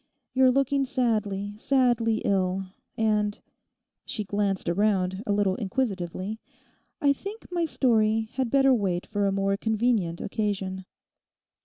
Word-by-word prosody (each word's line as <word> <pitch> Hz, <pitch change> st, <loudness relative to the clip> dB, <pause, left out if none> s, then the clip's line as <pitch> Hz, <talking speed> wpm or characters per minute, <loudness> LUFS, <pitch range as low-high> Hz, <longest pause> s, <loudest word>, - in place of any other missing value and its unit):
—you're 260 Hz, 0 st, +5 dB
looking 275 Hz, +1 st, +2 dB
sadly, 210 Hz, -6 st, -1 dB
sadly 240 Hz, -4 st, +2 dB
ill; 190 Hz, -1 st, +1 dB, 0.3 s
and,' 210 Hz, -2 st, +1 dB, 0.6 s
she 215 Hz, -, -3 dB
glanced 200 Hz, -1 st, -1 dB
round 190 Hz, 0 st, +1 dB
a -, -, +1 dB
little 200 Hz, -2 st, +2 dB
inquisitively, 195 Hz, -2 st, -3 dB, 0.6 s
'I 280 Hz, -1 st, +4 dB
think 405 Hz, +9 st, -8 dB
my 345 Hz, -1 st, 0 dB
story 220 Hz, -5 st, +2 dB
had 260 Hz, -2 st, -1 dB
better 270 Hz, +1 st, +4 dB
wait 190 Hz, -6 st, 0 dB
for 205 Hz, -1 st, 0 dB
a -, -, +1 dB
more 195 Hz, 0 st, 0 dB
convenient 220 Hz, -6 st, 0 dB
occasion. 195 Hz, -3 st, -3 dB
210 Hz, 125 wpm, -26 LUFS, 195-245 Hz, 0.6 s, you're